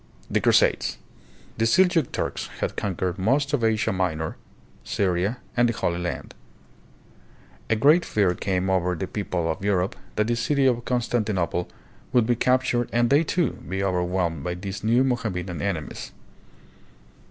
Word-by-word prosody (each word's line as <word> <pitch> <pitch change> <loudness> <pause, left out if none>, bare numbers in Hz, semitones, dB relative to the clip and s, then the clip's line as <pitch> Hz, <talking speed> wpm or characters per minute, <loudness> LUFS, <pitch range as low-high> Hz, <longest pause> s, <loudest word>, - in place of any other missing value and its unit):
The - - +2
Crusades. - - +3 0.6
The 115 - +3
Seljuk 165 +3 +3
Turks - - -3
had - - -2
conquered 95 -2 -2
most 140 +8 +1
of 135 -5 +1
Asia 110 -1 +2
Minor, 80 -4 -1 0.5
Syria, 95 +4 0 0.2
and 120 0 +4
the - - 0
Holy 85 -5 -1
Land. 90 -1 -4 1.4
A 115 - +3
great 150 +10 +5
fear 100 -4 +1
came 95 0 -1
over 90 -1 +1
the 85 - -3
people 90 -3 -2
of 80 +3 -3
Europe 100 -1 +1 0.2
that 105 - +2
the 120 +1 0
city 135 +4 +1
of 120 -2 +2
Constan 120 -2 0
tinople 90 -4 -1 0.4
would 120 -3 +4
be 120 +1 +2
captured 125 0 +1
and 120 +1 +2
they, 145 +3 +5
too, 165 -2 +1 0.2
be 95 +2 -1
overwhelmed 90 -4 0
by 90 +2 -2
these 100 +2 -6
new 115 +4 +4
Mohammedan 100 -9 -2
enemies. 90 -7 -4
105 Hz, 155 wpm, -25 LUFS, 90-120 Hz, 1.4 s, great